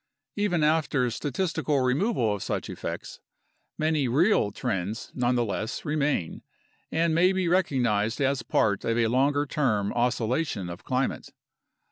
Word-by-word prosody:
Even 190 -6 +1
after 150 -5 +2
statistical 145 +2 -1
removal 130 - +1
of 100 - -5
such - - -3
effects, - - -6 0.6
many 155 -3 +1
"real" 150 - +3
trends 100 +1 -3
nonetheless 120 - -1
remain 145 - -1 0.5
and 165 0 +1
may 180 +3 +4
be 190 -2 0
recognized 125 - +1
as 135 -2 +1
part 100 -3 +1
of 115 0 0
a 120 - +3
longer 140 +5 +2
term 110 -9 0
oscillation 120 - -1
of 85 - -9
climate. 130 +1 -2
130 Hz, 125 wpm, -27 LUFS, 115-155 Hz, 0.6 s, may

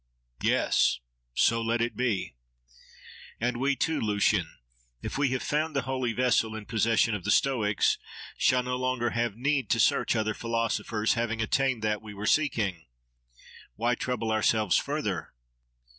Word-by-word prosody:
—Yes! - - +2 0.4
So 115 0 +3
let 115 +1 0
it 120 +1 -1
be. 120 -6 -1 1.1
—And 120 +1 -1
we 135 +3 +1
too, 160 +3 0
Lucian! 105 -4 +1 0.5
if - - -4
we 145 0 +2
have 130 0 -2
found 155 +1 -1
the 140 - +1
holy 130 -1 -1
vessel 115 -2 +1
in 110 -1 -7
possession 115 +1 +2
of 105 -4 -3
the 105 - -3
Stoics, 105 -4 +2 0.4
shall 125 0 +2
no 125 0 -2
longer 130 -2 -1
have 115 -3 -1
need 135 -1 0
to - - +2
search - - +3
other 110 -1 0
philosophers, 115 -1 -1
having 115 -1 -2
attained 125 +1 0
that 105 -1 0
we 105 -1 -10
were 100 +1 -5
seeking. 105 - 0 0.9
Why 120 +2 +1
trouble 120 -2 -2
ourselves 110 -3 +2
further? - - -2
115 Hz, 150 wpm, -28 LUFS, 110-125 Hz, 1.1 s, So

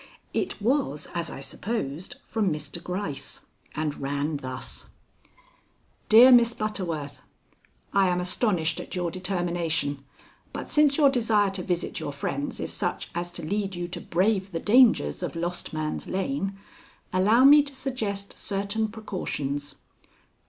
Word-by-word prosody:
It - - -2
was, 205 - 0
as 170 -1 -2
I - - -7
supposed, 185 - -4
from 210 -5 0
Mr. 150 +2 -5
Gryce, 180 -6 -5 0.3
and 150 -1 -2
ran 145 +2 -1
thus: 130 -2 -5 1.2
"DEAR 235 +4 +9
MISS 235 -1 +6
BUTTERWORTH: 170 -9 -3 0.7
"I 195 -1 +4
am 180 0 +1
astonished 180 -3 +1
at - - -7
your 175 -2 -1
determination, 175 -6 -1 0.5
but - - -6
since 295 -2 +4
your 285 -3 +6
desire 220 -5 +2
to 190 -1 -3
visit 175 -1 -2
your - - -4
friends 140 0 -3
is - - -3
such - - -3
as 175 +1 -3
to - - -5
lead 195 +1 -1
you 175 0 -3
to - - -5
brave 195 +2 +1
the 165 - -2
dangers 215 - +4
of - - -4
Lost 175 +1 -3
Man's 155 -1 -3
Lane, 195 0 -2 0.6
allow 210 +7 +5
me 290 +2 +9
to 280 -1 -7
suggest 220 -7 -3
certain 200 +2 -2
precautions. 150 -10 -4
185 Hz, 140 wpm, -26 LUFS, 160-220 Hz, 1.2 s, DEAR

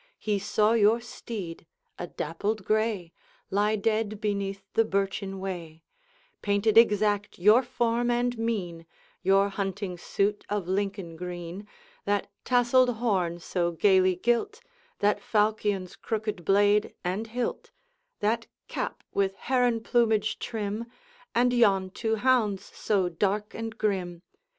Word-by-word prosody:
He 210 -2 -1
saw 210 +2 +2
your 225 +1 +4
steed, 205 -8 -7 0.3
a 175 - -4
dappled 190 +7 -3
gray, 215 -6 0 0.4
Lie 205 +2 +2
dead 215 0 0
beneath 200 -2 -2
the 225 - +4
birchen 195 -1 -2
way; 170 -4 -6 0.6
Painted 205 +1 +1
exact 210 -2 +4
your 210 +7 +6
form 240 -1 0
and 245 0 +1
mien, 190 -8 -3 0.3
Your 195 +1 +4
hunting 195 -2 -4
suit 205 +3 -1
of 205 -4 -2
Lincoln 195 -3 -2
green, 175 +3 -6 0.4
That 205 0 0
tasselled 245 0 +4
horn 190 -7 0
so 175 0 -1
gayly 185 +1 +4
gilt, 240 - 0 0.4
That 205 +1 +1
falchion's 210 -3 0
crooked 215 -5 -3
blade 205 +3 +3
and 190 +5 -2
hilt, 240 +1 -3 0.5
That 230 +3 0 0.2
cap - - -4
with 195 -1 +1
heron 245 -2 +1
plumage 220 -3 +2
trim, 215 +1 -3 0.5
And 245 +1 +3
yon 195 -6 +3
two 225 +2 -1
hounds 215 -5 +1
so 195 -4 +1
dark 200 +4 -1
and 225 0 -5
grim. 185 -5 -2
205 Hz, 125 wpm, -27 LUFS, 190-225 Hz, 0.6 s, your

